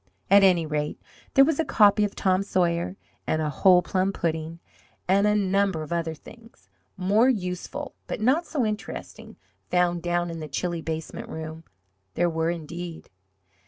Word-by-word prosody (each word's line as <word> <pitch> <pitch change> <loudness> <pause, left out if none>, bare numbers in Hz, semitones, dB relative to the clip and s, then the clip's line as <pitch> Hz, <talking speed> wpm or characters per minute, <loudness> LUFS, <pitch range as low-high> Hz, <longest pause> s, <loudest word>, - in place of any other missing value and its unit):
At 200 0 +8
any 180 -4 +4
rate 150 -1 -3 0.4
there 275 - +8
was 320 0 0
a - - +3
copy 210 -6 +4
of 205 - -2
"Tom 185 0 +2
Sawyer," 180 -1 0 0.3
and 155 - +1
a 155 -1 -1
whole 180 +4 +5
plum 185 +2 0
pudding, 160 -2 -3 0.5
and 200 +3 +4
a 210 - +3
number 195 -4 +1
of 155 - -5
other 165 -1 -2
things, 225 - -17 0.3
more 205 +7 +3
useful 200 +6 -3
but - - -4
not 275 +10 +2
so 275 -7 0
interesting, 210 -1 -6 0.3
found 175 -1 +1
down 175 0 -1
in 165 - -6
the 155 - -6
chilly 170 +4 -3
basement 160 0 -5
room. 160 0 -7 0.5
There 175 0 +2
were, 160 0 0
indeed. 170 0 -6
180 Hz, 160 wpm, -25 LUFS, 165-200 Hz, 0.5 s, At